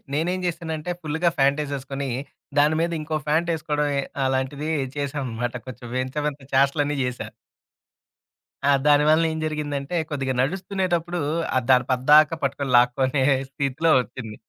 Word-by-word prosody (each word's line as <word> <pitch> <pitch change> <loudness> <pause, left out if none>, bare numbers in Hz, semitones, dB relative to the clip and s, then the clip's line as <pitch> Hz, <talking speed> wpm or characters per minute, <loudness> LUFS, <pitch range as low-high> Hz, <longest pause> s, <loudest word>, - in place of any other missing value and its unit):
నేనేం 175 +5 0
జేశానంటే 165 -1 -3
ఫుల్లుగా 160 +3 0
ఫ్యాంటేసేసుకోని, 140 -1 0 0.5
దాని 150 +2 +4
మీద 170 0 0
ఇంకో 155 0 -2
ఫ్యాంటేసుకోవడం, 155 -2 0 0.4
అలాంటిది 130 +3 -1 0.3
చేశాననమాట. 130 -4 -3
కొంచెం 120 -1 -9
వింత 130 +1 -3
వింత 145 -1 -5
చేస్టలన్ని 145 +2 +2
జేశా. 125 0 -4 1.4
ఆ! - - +6
దాని 145 0 +5
వలన 160 +1 +4
ఏం 160 - -4
జరిగిందంటే 150 0 -3
కొద్దిగా 135 -3 -2
నడుస్తునేటప్పుడు, 175 +1 -1 0.4
ఆ - - +5
దాన 125 -1 +6
పద్దాకా 150 +5 +5
పట్టుకుని, 140 0 -1
లాక్కోనే 130 +2 +2 0.3
స్థితిలో 140 +4 0
వచ్చింది. 115 -3 -8
145 Hz, 120 wpm, -24 LUFS, 135-160 Hz, 1.4 s, ఆ